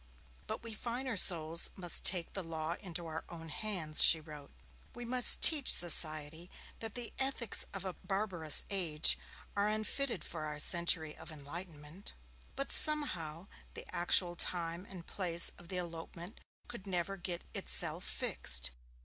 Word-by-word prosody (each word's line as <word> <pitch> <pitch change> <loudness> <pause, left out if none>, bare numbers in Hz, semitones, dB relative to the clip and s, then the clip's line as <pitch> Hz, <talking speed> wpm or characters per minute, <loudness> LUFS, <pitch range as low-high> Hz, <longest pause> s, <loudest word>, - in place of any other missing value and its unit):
'But - - -7
we 230 -1 -8
finer 240 +2 -5
souls 165 -3 +4
must 175 -3 0
take 175 -3 +1
the 195 - -5
law 160 0 -5
into 175 -2 -8
our 160 0 -7
own 165 -2 -11
hands,' 160 -3 -1
she 165 - +5
wrote. 150 -2 -13 0.5
'We 240 - -9
must 250 +1 +6
teach 300 -5 +9
society 160 0 +2 0.3
that 225 -1 -5
the 245 -2 -6
ethics 265 -5 +1
of 195 -1 -8
a 185 - -5
barbarous 190 -7 +1
age 165 -6 0 0.4
are 200 0 -1
unfitted 215 +5 -4
for 155 -2 -7
our 150 -1 -7
century 165 0 +1
of - - -13
enlightenment.' 155 +3 -11 0.4
But 275 +1 -5
somehow 180 - +1 0.3
the - - -9
actual 175 0 +2
time 170 +1 -3
and 180 -3 -11
place 170 -4 +1
of 175 - -16
the 185 0 -6
elopement 170 +2 -9 0.3
could 235 -5 -11
never 185 +1 -3
get 175 -2 -6
itself - - -2
fixed. 60 0 -1
175 Hz, 150 wpm, -32 LUFS, 160-200 Hz, 0.5 s, teach